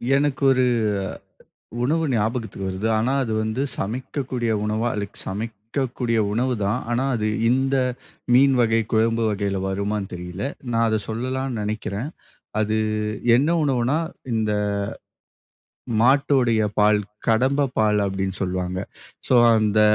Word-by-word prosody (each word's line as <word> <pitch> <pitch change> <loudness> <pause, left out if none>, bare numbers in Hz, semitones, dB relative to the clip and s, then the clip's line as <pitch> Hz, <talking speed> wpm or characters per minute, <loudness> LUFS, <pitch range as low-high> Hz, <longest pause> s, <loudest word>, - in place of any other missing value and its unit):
எனக்கு 140 -1 0
ஒரு 130 -1 +3 1.2
உணவு 160 +6 +1
ஞாபகத்துக்கு 110 -3 -2
வருது. 95 +4 -2
ஆனா 120 +4 +1
அது 115 -4 -2
வந்து 110 +4 -1 0.2
சமைக்கக்கூடிய 125 +2 -3
உணவா? 110 +3 0
அதுக் 100 -1 -5
சமைக்கக்கூடிய 115 +4 -2
உணவு 125 +4 +1
தான். 105 +6 0
ஆனா 120 +2 +1
அது 110 -1 -1 0.2
இந்த 135 +2 +2 0.6
மீன் 135 +2 +6
வகை, 115 -1 +3
குழம்பு 115 +1 +2
வகையில 100 -1 -1
வருமான்னு 100 +1 -2
தெரியல. 90 +2 -6 0.3
நான் 115 0 +3
அதை 110 0 +1
சொல்லலாம்ன்னு 130 +1 -2
நெனைக்கிறேன். 105 +3 -3 0.5
அது 110 0 +1 0.6
என்ன 140 +6 +3
உணவுன்னா, 130 0 +1 0.4
இந்த 110 -1 0 1.5
மாட்டோடைய 125 -3 +3 0.2
பால். 105 0 +5 0.3
கடம்பை 130 +5 +3
பால் 105 -1 +3
அப்படின்னு 95 -1 -2
சொல்வாங்க. 90 0 -2 0.5
சோ - - +3 0.2
அந்த 110 -1 +2
115 Hz, 115 wpm, -23 LUFS, 105-130 Hz, 1.5 s, மீன்